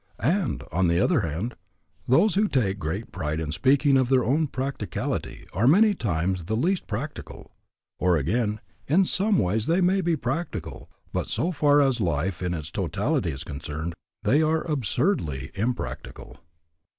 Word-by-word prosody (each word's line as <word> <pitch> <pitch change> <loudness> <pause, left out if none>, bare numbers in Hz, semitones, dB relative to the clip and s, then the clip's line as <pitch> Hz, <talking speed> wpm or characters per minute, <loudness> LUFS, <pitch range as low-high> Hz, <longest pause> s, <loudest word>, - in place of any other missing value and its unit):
And, 165 - 0
on 90 +3 +2
the 85 +1 +2
other 160 - +3
hand, 95 +6 -3 0.5
those 175 - +4
who 210 +2 +3
take 105 - 0
great 95 +6 -4
pride 80 -3 -3
in 80 -2 -3
speaking 135 - +3
of 130 -2 +2
their 130 -2 +4
own 150 +7 +2
practicality 135 +1 -4
are 105 +8 +2
many 205 +8 +6
times 90 - -1
the 110 +5 -1
least 180 +9 0
practical. 125 +8 -6 0.5
Or 90 -1 +3
again, 105 - 0 0.3
in 185 +7 +4
some 200 +3 +2
ways 105 +4 0
they 170 +3 +3
may 190 +1 +3
be 170 -2 +1
practical, 150 +7 -4 0.2
but - - -1
so 175 - 0
far 145 -2 +4
as 130 -4 +1
life 85 +1 -1
in 90 -1 -1
its 80 -1 -6
totality 85 -2 -1
is 70 -4 -5
concerned, 75 +4 -5 0.3
they 145 +4 +4
are 160 0 +1
absurdly 120 - -1
impractical. 120 +5 -4
120 Hz, 160 wpm, -25 LUFS, -, 0.5 s, many